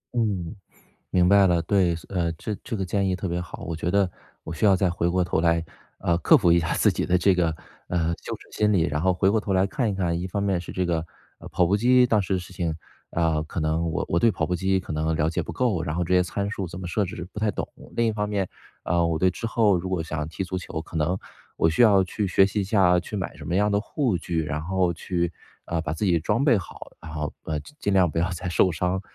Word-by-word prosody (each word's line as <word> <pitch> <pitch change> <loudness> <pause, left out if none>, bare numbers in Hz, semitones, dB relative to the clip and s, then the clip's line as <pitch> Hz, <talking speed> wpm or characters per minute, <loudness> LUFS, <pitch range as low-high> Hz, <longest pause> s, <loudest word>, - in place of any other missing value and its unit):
嗯， 105 -5 -1 0.6
明 90 0 +4
白 100 -1 +6
了。 85 -2 +3
对， 90 -1 +2
所 80 - -11
呃， 85 -2 +1
这 105 +5 -5
这 - - -4
个 95 - -2
建 100 +1 0
议 95 - +1
特 95 - -4
别 85 0 -2
好。 85 - -8
我 85 - -4
觉 85 +2 -2
得 100 -3 +2 0.3
我 - - -7
需 85 +6 0
要 100 -2 +6
再 95 -1 +1
回 85 0 -1
过 90 +1 +2
头 85 - 0
来， 85 0 +2 0.4
呃， 85 -1 +1
克 85 - +5
服 85 - +4
一 85 - +5
下 80 - -1
自 - - +3
己 - - -2
的 90 - +2
这 90 +1 +4
个， 85 -3 +1 0.3
呃， 85 -2 0
羞 - - -4
耻 - - -14
心 105 0 +3
理， 90 - +3
然 75 +1 -1
后 95 +3 +2
回 95 +2 +2
过 110 - +2
头 100 -2 -2
来 95 +1 +3
看 125 +1 -1
一 100 - 0
看 85 -3 -1
一 90 - -3
方 100 +2 -3
面 95 -3 +1
是 85 - -8
这 90 - -1
个， 85 -2 -1 0.3
呃， - - -11
跑 90 -2 +2
步 100 - +2
机 125 +3 +5
当 110 -3 +3
时 95 0 -1
的 95 - +1
事 90 +1 -11
情， 85 -3 -2 0.4
啊， 80 -2 +1
可 80 - -5
能 80 +1 0
我 - - -1
我 85 - +1
对 115 +4 +4
跑 80 - -2
步 90 - 0
机 95 +1 +1
可 90 - -7
能 80 +1 0
了 80 +1 +1
解 85 - -2
不 - - -7
够， 110 -10 0
然 80 0 -3
后 90 - 0
这 90 +2 +1
些 90 - +4
参 100 +3 -3
数 95 -4 -4
怎 90 +2 -8
么 90 - -5
设 100 +3 0
置 90 -1 -6
不 - - -6
太 105 -1 +1
懂。 - - -4 0.3
另 115 -1 +2
一 - - +2
方 105 -1 -2
面， 100 -3 -1 0.3
呃， 85 0 +1
我 80 -1 0
对 95 - +4
之 115 - -6
后， 110 -4 +3
如 90 +2 -4
果 90 -3 0
想 80 -1 -5
要 75 - -2
踢 80 +5 -5
足 95 0 -4
球， 80 -2 -5
可 80 - -7
能 80 +4 +1 0.4
我 80 - +3
需 120 +9 +3
要 100 -4 +6
去 100 +3 -2
学 95 +1 +4
习 105 +1 -2
一 - - -1
下， 95 -3 +3
去 105 - -7
买 95 -3 -4
什 - - -10
么 - - -2
样 105 +2 +2
的 100 - +2
护 115 - -1
具， 80 -1 -2
然 75 +1 -3
后 90 0 +1
去， 85 0 -2 0.3
呃， 85 -1 -2
把 80 -1 -3
自 80 - -4
己 85 -4 +3
装 135 - 0
备 125 -7 +5
好， 90 - -9
然 80 -1 -10
后 75 -1 -3
呃， 75 -1 -2
尽 150 - -14
尽 100 - 0
量 90 -3 +4
不 80 - -5
要 85 - +2
再 90 0 -4
受 90 +1 +3
伤。 90 +3 -1
90 Hz, 305 characters per minute, -25 LUFS, 85-100 Hz, 0.6 s, 白